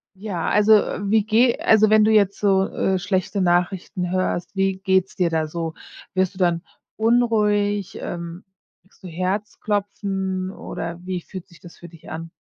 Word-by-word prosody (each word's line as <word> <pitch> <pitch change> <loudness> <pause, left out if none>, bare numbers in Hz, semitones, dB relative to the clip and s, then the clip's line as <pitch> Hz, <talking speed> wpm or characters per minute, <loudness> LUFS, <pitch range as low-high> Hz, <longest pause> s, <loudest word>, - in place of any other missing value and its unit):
Ja, 190 -4 -3
also, 210 +1 +5
wie 210 0 +2
geh 230 +3 +3
also, 215 -1 +4
wenn 215 0 +6
du 215 - +4
jetzt 200 -2 +3
so, 195 -2 +2
äh, 190 -1 -1
schlechte 190 +1 -1
Nachrichten 180 0 0
hörst, 185 -1 -1
wie 195 0 +1
geht's 190 +1 +1
dir 180 -4 +1
da 160 -1 0
so? 165 0 -4 0.4
Wirst 185 -1 +1
du - - -16
dann 175 -2 +1 0.3
unruhig, 210 -4 +1
ähm, 170 +1 -6 0.4
kriegst 190 +2 -29
du - - -7
Herzklopfen, 195 +1 -2
oder 170 -3 -6
wie 185 -1 -3
fühlt 185 +1 -9
sich 170 - -19
das 175 - -14
für 175 - -11
dich 165 0 -15
an? 165 +1 -6
190 Hz, 165 wpm, -22 LUFS, 175-205 Hz, 0.4 s, wenn